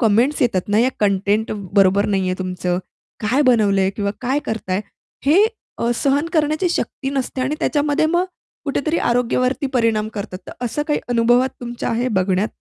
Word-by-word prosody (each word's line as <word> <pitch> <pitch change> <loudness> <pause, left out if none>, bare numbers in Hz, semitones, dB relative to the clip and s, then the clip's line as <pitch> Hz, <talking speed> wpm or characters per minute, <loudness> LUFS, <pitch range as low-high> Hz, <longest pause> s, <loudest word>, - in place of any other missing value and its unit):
Comments 240 +6 +3
येतात 210 -6 0
ना, 205 +1 +2
या 245 - +4
कंटेंट 205 +2 +1 0.2
बरोबर 200 0 +4
नाहीये 190 -3 0
तुमचं? 180 -1 -2 0.4
काय 245 +7 +2
बनवलंय 200 -6 +3
किंवा 200 -1 0
काय 260 +3 0
करताय. 195 -4 -2 0.5
हे 355 +8 +6 0.3
अ, 235 - 0
सहन 280 +5 +1
करण्याची 310 +2 +1
शक्ती 275 -4 -2
नसते 270 -1 -2
आणि 265 +4 0
त्याच्यामध्ये 295 +1 +1
मग 345 +3 +2 0.4
कुठेतरी 305 +3 0
आरोग्यावरती 250 +3 +1
परिणाम 225 -3 +2
करतात, 200 -3 -5
तर - - -7
असं 245 +5 -1
काही 295 - +1
अनुभवात 240 +2 +3
तुमच्या 240 -1 -4
आहे 240 +2 0
बघण्यात? 190 -2 +1
235 Hz, 155 wpm, -20 LUFS, 200-275 Hz, 0.5 s, हे